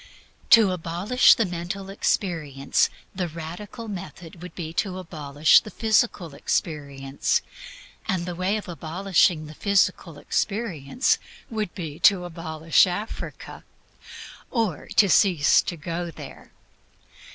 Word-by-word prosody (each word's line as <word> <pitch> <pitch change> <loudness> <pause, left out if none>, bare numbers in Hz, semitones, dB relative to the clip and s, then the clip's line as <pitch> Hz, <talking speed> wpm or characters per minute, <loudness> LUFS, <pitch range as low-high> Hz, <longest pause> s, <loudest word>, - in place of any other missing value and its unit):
To 220 -5 +7
abolish 180 +8 +3
the 230 - +1
mental 180 +2 -5
experience 160 - 0 0.2
the 180 -2 -2
radical 170 +8 -8
method 175 -3 -8
would 180 - -9
be 165 -2 -6
to 190 -3 -6
abolish 155 -4 +3
the - - -10
physical 215 -7 +1
experience, 140 -2 -2 0.6
and 180 -2 -1
the 180 - -4
way 185 +4 0
of 210 - -7
abolishing 175 0 +1
the 155 - -10
physical 200 +4 +1
experience 200 - -1 0.3
would 215 -5 -3
be 160 -4 -6
to 180 0 +4
abolish 165 -1 +2
Africa, 195 +5 -6 0.9
or 220 - -1
to 205 - +6
cease 175 -4 +4
to 170 - -5
go 170 +3 -4
there. 165 - -11
175 Hz, 120 wpm, -24 LUFS, 160-200 Hz, 0.9 s, To